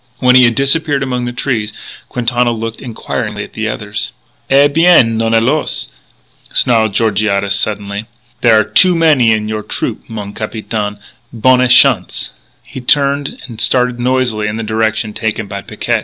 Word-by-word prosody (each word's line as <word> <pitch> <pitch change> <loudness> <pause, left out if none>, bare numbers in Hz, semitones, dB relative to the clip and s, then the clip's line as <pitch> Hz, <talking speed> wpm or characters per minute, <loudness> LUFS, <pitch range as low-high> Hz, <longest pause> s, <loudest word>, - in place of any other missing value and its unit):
When 125 -1 +3
he 130 -1 +7
had 115 -1 +2
disappeared 140 0 +1
among 125 -2 -2
the 120 - -3
trees, 120 -4 -2 0.4
Quintana 120 0 0
looked 115 0 -5
inquiringly 120 -4 -5
at - - -12
the 110 0 -3
others. 105 -1 -5 0.4
"Eh, 140 +2 +5
bien, 145 -6 +4
non 115 0 0
alors!" 130 +7 0 0.6
snarled 110 -4 +2
Georgiades 100 -2 +1
suddenly. 100 +1 -2 0.3
"There 115 -3 +5
are - - +3
too 180 - +3
many 150 -8 +3
in 105 -1 0
your 110 0 -3
trupeau, - - -4
mon 105 -3 -7
capitaine. 110 -1 -4 0.3
Bonne 125 +2 +3
chance!" 125 -7 +3 0.3
He 130 - -9
turned 140 +2 +1
and 115 -3 -8
started 125 -1 +1
noisily 125 -4 0
in 105 - -3
the 115 - -4
direction 110 0 -1
taken 110 -1 -3
by 100 0 -6
Picquet. - - -2
115 Hz, 155 wpm, -14 LUFS, 110-130 Hz, 0.6 s, he